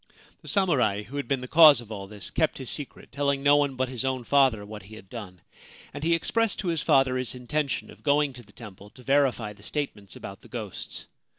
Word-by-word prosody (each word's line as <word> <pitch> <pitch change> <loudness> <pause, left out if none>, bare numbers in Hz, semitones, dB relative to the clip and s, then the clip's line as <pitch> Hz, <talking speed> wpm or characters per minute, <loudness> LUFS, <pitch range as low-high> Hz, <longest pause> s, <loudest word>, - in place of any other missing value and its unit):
The - - -15
samurai 125 - +2
who 130 +8 -8
had 140 - -3
been 135 -2 0
the 125 - -6
cause 155 -1 +8
of 115 -2 -10
all 100 -2 -6
this 105 -1 -7
kept 160 -2 +1
his 130 -3 -3
secret, 145 -3 -7
telling 140 0 0
no 145 0 +6
one 140 -2 +1
but 130 0 0
his 125 -3 -4
own 130 -2 -1
father 130 -5 +3
what 105 0 -9
he 100 +4 -13
had 95 -3 -14
done; 95 -7 -8 0.5
and 145 +1 -6
he 170 +1 +4
expressed 225 +6 0
to 185 - -2
his 165 -3 0
father 135 -1 +3
his 130 0 -3
intention 140 +3 -2
of - - -16
going 145 -1 +2
to 125 - -11
the 105 -3 -19
temple 105 -2 -12
to 125 - -17
verify 130 -6 +1
the 105 - -19
statements 105 - -4
about - - -9
the - - -15
ghosts. - - -7
130 Hz, 230 wpm, -26 LUFS, 110-145 Hz, 0.5 s, cause